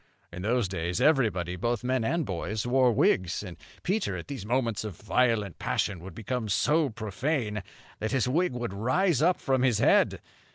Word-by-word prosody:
In 90 - -6
those 115 +1 +1
days 90 +1 -2
everybody, 110 - +2
both 120 +5 -1
men 130 -1 0
and 165 +7 0
boys, 100 +4 -3
wore 125 0 +4
wigs; 90 -4 +1
and 90 -4 -8 0.3
Peter, 195 +3 -1
at - - -9
these 130 -8 -6
moments 120 -3 0
of 105 -5 -6
violent 110 -2 0
passion, 95 - -1
would 90 0 -10
become 115 0 -3
so 145 - +2
profane 110 - -2 0.4
that 110 - -2
his 130 -1 +1
wig 170 +7 +1
would 120 -4 -4
rise 130 - +1
up 175 +3 +3
from 130 -1 +1
his 125 -4 +3
head. - - +3
115 Hz, 175 wpm, -28 LUFS, 100-130 Hz, 0.4 s, wore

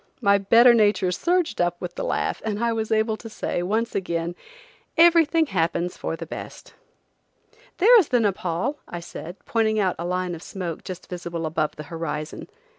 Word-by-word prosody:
My 200 0 +4
better 230 +5 +6
nature 205 -4 +3
surged 340 - 0
up 175 0 0
with 180 -1 -6
the - - -5
laugh, - - -1
and 210 -2 -2
I 235 -1 +2
was 220 0 -3
able 220 0 +2
to 225 - -10
say, 195 - -3
once 220 +6 -1
again: 170 -2 -2 0.6
"Everything 330 -1 +5
happens 175 - -1
for - - -4
the 165 - -7
best." - - -9 1.0
"There 465 +5 +7
is 360 - +1
the 245 - +2
Nepaul," 195 - -1
I 175 - -6
said, 170 0 -8
pointing 220 -1 +1
out 190 -3 +1
a 170 - -3
line 180 0 -1
of 165 - -7
smoke 175 -4 -6
just 185 -1 -8
visible 170 -2 -5
above 155 -1 -1
the 150 - -7
horizon. 155 -2 -5
190 Hz, 180 wpm, -24 LUFS, 170-225 Hz, 1.0 s, There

